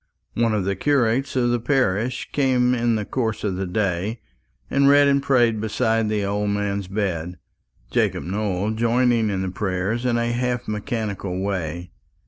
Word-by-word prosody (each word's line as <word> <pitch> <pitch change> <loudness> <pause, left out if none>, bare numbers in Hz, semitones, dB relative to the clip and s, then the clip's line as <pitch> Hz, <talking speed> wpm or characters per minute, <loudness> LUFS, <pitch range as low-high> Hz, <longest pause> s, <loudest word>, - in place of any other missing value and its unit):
One 115 -2 +1
of 100 -3 -1
the 100 0 0
curates 135 -1 +1
of 120 -2 +2
the 120 - +1
parish 125 -2 0
came 125 -3 +2
in 120 -1 +1
the 105 -1 -2
course 115 -3 -2
of 100 -3 -1
the 95 0 -3
day, 100 +3 -1 0.5
and 140 0 +3
read 145 0 +6
and 140 0 +3
prayed 120 -6 +2
beside 110 0 0
the 105 -2 0
old 105 +1 -1
man's 100 -1 -1
bed, 90 -4 -3 0.5
Jacob - - +1
Nowell 100 +1 -1
joining 115 0 +2
in 95 -2 -1
the 95 - -2
prayers 95 +4 -2
in 120 -2 +1
a 120 0 0
half 125 0 -1
mechanical 105 -4 -3
way. 85 -3 -3
110 Hz, 165 wpm, -22 LUFS, 100-120 Hz, 0.5 s, read